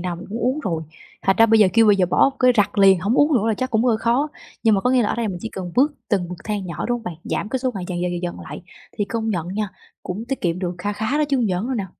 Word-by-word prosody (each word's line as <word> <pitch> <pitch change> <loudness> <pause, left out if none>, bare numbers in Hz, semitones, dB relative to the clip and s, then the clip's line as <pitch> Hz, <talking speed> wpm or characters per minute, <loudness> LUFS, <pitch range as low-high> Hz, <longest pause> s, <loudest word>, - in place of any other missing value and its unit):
nào 175 -1 -3
mình 175 - -10
cũng 215 +3 -4
uống 255 +6 0
rồi, 165 - -2 0.4
thành 195 - +2
ra 225 - +6
bây 225 0 +4
giờ 195 - +6
kêu 225 -1 +5
bây 205 -1 +5
giờ 185 -2 +2
bỏ 225 +9 +3
cái 255 -1 +5
rặt 205 0 +1
liền 195 -2 +6
hổng 200 +6 0
uống 295 +3 +4
nữa 225 -1 +2
là 220 - +2
chắc 255 +5 -3
cũng 225 +1 +2
hơi 235 -3 +3
khó. 240 +6 +1 0.3
Nhưng 220 -3 +4
mà 195 - +1
có 250 - +1
nghĩa 255 -1 +4
là 210 - 0
ở - - -1
đây 235 -2 -1
mình 180 -3 -4
chỉ 225 - -5
cần 180 -4 -7
bước 285 +4 +3 0.2
từng 190 -5 0
bậc 180 -1 -7
thang 205 -3 -3
nhỏ, 170 -3 -4
đúng 245 - 0
hông - - -14
bạn? 180 - -4
Giảm 210 - -2
cái 260 - -1
số 255 0 -1
ngày 185 -2 -4
dần, 175 -2 -3
dần, 180 0 -1
dần, 175 0 -4
dần 175 - -4
lại 155 +1 -9 0.4
thì 205 - +1
công 225 +1 -2
nhận 175 -3 -2
nha, 205 +1 -2 0.3
cũng 205 +5 -5
tiết 270 - -2
kiệm 175 0 -1
được 180 -1 -3
kha 205 +3 -2
khá 220 +8 -1
đó 300 - +3
chứ 275 - +2
hông 240 -3 +1
giỡn 185 +3 -1
đâu 260 - -2
nè. 205 -4 -2
210 Hz, 335 wpm, -21 LUFS, 180-235 Hz, 0.4 s, ra